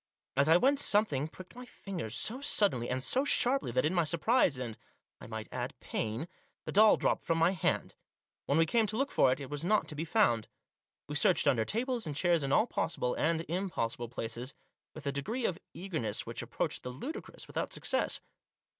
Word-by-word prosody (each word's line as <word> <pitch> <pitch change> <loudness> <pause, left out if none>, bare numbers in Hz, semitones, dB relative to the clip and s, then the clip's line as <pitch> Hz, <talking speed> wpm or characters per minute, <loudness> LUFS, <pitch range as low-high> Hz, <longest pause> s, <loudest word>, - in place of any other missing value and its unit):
As 140 +3 +3
I 165 - +7
went 275 +7 +3
something 205 - +2
pricked 185 +3 -13
my 250 - -8
fingers 175 - -6
so 245 - -1
suddenly, 195 - +2
and 130 +1 0
so 260 - +3
sharply, 270 - +4
that 130 +3 +2
in 160 - +1
my 175 -2 +3
surprise 170 - +2
and, 120 -4 -5 0.4
I - - -10
might 110 -1 -6
add, - - -5
pain, 110 +9 -3 0.4
the - - -4
doll 215 +2 +6
dropped - - +1
from 165 - 0
my 165 +2 +4
hand. 185 -5 -1 0.5
When 140 - +2
we 165 - +5
came 220 +6 +2
to 215 - -1
look 275 +2 0
for 130 - +4
it 130 - -1
it 140 0 -8
was 145 +1 -4
not 210 +4 +2
to 150 - -5
be 155 - -3
found. 160 - +2 0.6
We 145 - -6
searched 150 - +3
under 120 -6 +3
tables 240 -1 -1
and 150 - -4
chairs 175 0 +2
in 135 -1 -2
all 215 - +4
possible 125 - -1
and 165 +1 0
impossible 165 - -3
places, 120 +2 -6 0.4
with 155 - -9
a 140 - 0
degree 220 - -3
of 180 0 -1 0.2
eagerness 125 - -3
which 115 - -5
approached - - -2
the 125 - -6
ludicrous, 155 - -7
without - - -4
success. - - -1
160 Hz, 200 wpm, -31 LUFS, 130-215 Hz, 0.6 s, I